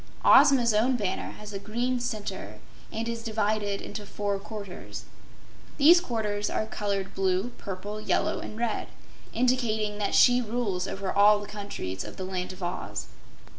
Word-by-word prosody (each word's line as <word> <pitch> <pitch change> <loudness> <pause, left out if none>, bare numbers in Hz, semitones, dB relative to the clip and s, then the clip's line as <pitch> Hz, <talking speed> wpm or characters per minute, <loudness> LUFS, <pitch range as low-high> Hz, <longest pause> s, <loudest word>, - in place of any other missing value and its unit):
Ozma's 265 -5 +7
own 235 +5 +3
banner 200 -6 -2
has 210 -1 -10
a 195 - -3
green 240 +5 -1
center, 205 - -4 0.3
and 225 +1 -3
is 230 0 -3
divided 215 -2 -1
into 210 +1 -6
four 200 0 -2
quarters. 200 -2 -8 0.7
These 335 +5 +7
quarters 210 - -2
are - - -1
colored 200 -3 -3
blue, 190 +3 +1
purple, 205 +2 -5
yellow - - +1
and 215 - -7
red, 235 -1 -1 0.4
indicating 225 -4 +1
that 205 - 0
she 245 0 +6
rules 215 -5 -1
over 195 -1 -3
all 205 +1 +6
the 205 - -7
countries 200 - -5
of - - -9
the 185 - -4
Land 185 -1 -3
of 185 0 -9
Oz. 175 - -4
210 Hz, 155 wpm, -28 LUFS, 200-230 Hz, 0.7 s, Ozma's